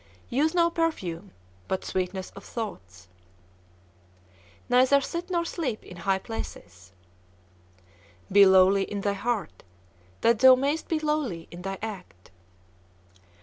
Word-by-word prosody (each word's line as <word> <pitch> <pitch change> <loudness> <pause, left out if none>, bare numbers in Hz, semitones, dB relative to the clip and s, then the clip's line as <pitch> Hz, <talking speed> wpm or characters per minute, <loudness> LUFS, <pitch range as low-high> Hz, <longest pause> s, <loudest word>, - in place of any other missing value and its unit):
Use 305 +7 +1
no 340 -1 +3
perfume 205 - -2 0.4
but 190 - -3
sweetness 185 0 -3
of 200 - -12
thoughts. 95 - -7 1.6
Neither 260 +3 +5
sit 340 +6 -5
nor 340 -2 0
sleep 280 -10 -3
in 180 - -12
high 190 +2 0
places. 95 - -8 1.4
Be 200 +1 +8
lowly 190 +1 +6
in 205 -1 -5
thy 200 0 0
heart, 200 -4 -3 0.6
that 230 -1 +3
thou 260 +1 +8
mayst 285 +5 -1
be 325 - 0
lowly 300 - -2
in 175 - -9
thy 195 +1 -4
act. 180 - -8
205 Hz, 120 wpm, -26 LUFS, 185-280 Hz, 1.6 s, Be